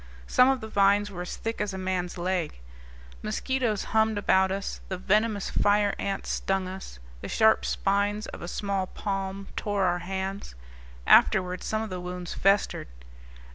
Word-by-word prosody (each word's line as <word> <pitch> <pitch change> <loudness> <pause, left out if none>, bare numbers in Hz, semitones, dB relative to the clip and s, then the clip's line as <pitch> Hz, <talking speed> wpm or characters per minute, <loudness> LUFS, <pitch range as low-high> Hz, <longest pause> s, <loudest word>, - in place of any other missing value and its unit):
Some 250 - +5
of 270 -1 +1
the 220 - -6
vines 205 0 +3
were 175 -2 -6
as 180 - -5
thick 225 -1 -3
as 205 -2 -2
a - - -4
man's 185 -1 -2
leg. 175 - -2 0.6
Mosquitoes 235 - -1
hummed 220 -1 +3
about 190 -2 +3
us, 195 0 -4
the 190 - -3
venomous 210 +2 +1
fire 205 0 +3
ants 195 -1 -2
stung 195 -1 -1
us, 185 - -8 0.2
the - - -5
sharp 220 -1 +4
spines 205 +2 0
of - - -9
a 175 - -5
small 195 0 -2
palm 195 0 -4
tore 205 -2 -1
our 175 -1 +1
hands 190 - -4 0.5
afterward 185 -1 +5
some 220 0 -1
of 220 - -6
the 180 -1 -4
wounds 180 -1 -5
festered. 195 +1 +1
195 Hz, 165 wpm, -27 LUFS, 185-210 Hz, 0.6 s, Some